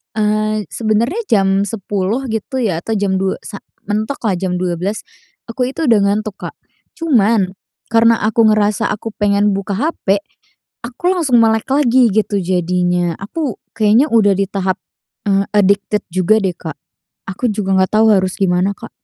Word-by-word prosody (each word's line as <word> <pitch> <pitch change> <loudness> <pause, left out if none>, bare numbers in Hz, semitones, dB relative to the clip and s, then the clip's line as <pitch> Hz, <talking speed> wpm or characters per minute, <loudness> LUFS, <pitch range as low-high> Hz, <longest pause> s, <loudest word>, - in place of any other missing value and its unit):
eee, 215 0 0
sebenernya 230 - 0
jam 195 -2 +3
10:00 205 +4 -2
gitu 225 +5 -4
ya 200 -9 0
atau 225 - -2
jam 200 -2 0
02:00 190 0 0
sa 200 - -8 0.3
mentok 215 +6 -2
lah 195 - +1
jam 185 -1 -2
12:00 180 +3 -2 0.4
aku 250 +2 -2
itu 325 - -2
udah 225 -3 +5
ngantuk, 210 0 -1
Kak. - - -7 0.4
Cuman, 225 - +2 0.4
karena 230 0 +4
aku 220 +1 +3
ngerasa 210 -1 +2
aku 220 +1 -5
pengen 205 0 +2
buka 195 0 -3
HP 215 - 0 0.7
aku 250 +9 -2
langsung 280 -10 +3
melek 220 0 +2
lagi 260 -3 +4
gitu 210 -1 +1
jadinya, 180 -1 0
aku 260 +5 -4 0.2
kayaknya 220 +5 +3
udah 210 -3 +4
di 195 - +1
tahap, 190 -1 -1 0.5
eee, 195 0 +2
addicted 200 +1 +2
juga 185 +4 +3
deh, 190 -2 -1
Kak. 160 -3 -8 0.5
Aku 220 +6 -2
juga 200 -2 -1
nggak 185 0 +2
tahu 220 0 +5
harus 185 -1 0
gimana, 185 0 +2
Kak. 230 - -10
210 Hz, 160 wpm, -16 LUFS, 195-225 Hz, 0.7 s, udah